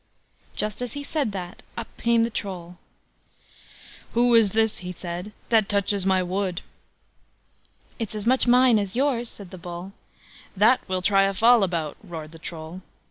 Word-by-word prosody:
Just 210 +3 -2
as 245 -2 -4
he 285 - -5
said 285 -6 -1
that, 180 -2 -7 0.2
up 235 - -4
came 235 -1 +3
the 230 - -1
Troll: 180 -5 -6 1.3
"Who 240 +1 +3
is 225 -4 +5
this", 220 -1 +2
he 180 -1 -6
said, 175 +3 -6 0.2
"that 220 -3 +3
touches 200 -1 +1
my 190 -1 +3
wood?" 185 0 -2 1.4
"It's 220 -2 -4
as 210 0 -4
much 255 +1 +4
mine 250 -2 +6
as 200 0 -3
yours", 250 -3 +1
said 195 -3 -11
the 185 - -9
Bull. 175 +2 -7 0.7
"That 220 +6 +5
we'll 185 -1 -2
try 195 0 +4
a 195 0 -1
fall 235 +3 +6
about", 170 -5 -1
roared 160 -3 -8
the 165 - -13
Troll. 165 +2 -8
200 Hz, 165 wpm, -25 LUFS, 180-230 Hz, 1.4 s, mine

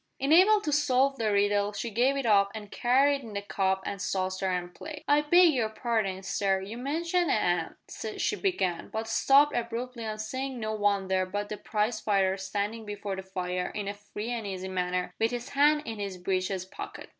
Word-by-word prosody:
Unable 365 +10 +5
to 305 - -2
solve 275 -2 +2
the 220 -2 +1
riddle 205 0 +2
she 225 +3 -4
gave 255 +6 +2
it 275 - -2
up 200 -3 +4
and 210 -2 -8
carried 275 +3 +3
in 225 -4 -10
the 200 - -2
cup 190 -1 0
and 200 -2 -4
saucer 185 +1 -1
and 180 -1 -3
plate. 305 -1 -8
"I 290 +1 +5
beg 345 +2 +5
your 230 -5 0
parding, 215 -4 -1
sir, 195 0 0
you 195 +4 -7
mentioned 330 +7 0
a - - +3
'am," 175 -5 0 0.4
she - - 0
began, 190 - -1
but 220 0 -4
stopped 275 +6 +4
abruptly 235 +1 -3
on 215 -1 -4
seeing 260 +4 -4
no 215 -1 -2
one 205 -2 +1
there 185 0 +1
but 205 +2 -3
the 210 - -4
prize 215 +2 -1
fighter 195 -3 +2
standing 205 +3 -3
before 205 -1 -5
the 190 - -5
fire 180 -1 -3
in 205 -1 -3
a 200 - -2
free 210 +2 -7
and 230 -4 -3
easy 190 -1 -5
manner 180 -1 -2
with 225 - +3
his 245 +1 -5
hands 295 +2 +3
in 225 -2 -5
his 200 -2 -4
breeches 185 0 -1
pockets. 190 - -9
210 Hz, 200 wpm, -28 LUFS, 190-255 Hz, 0.4 s, Unable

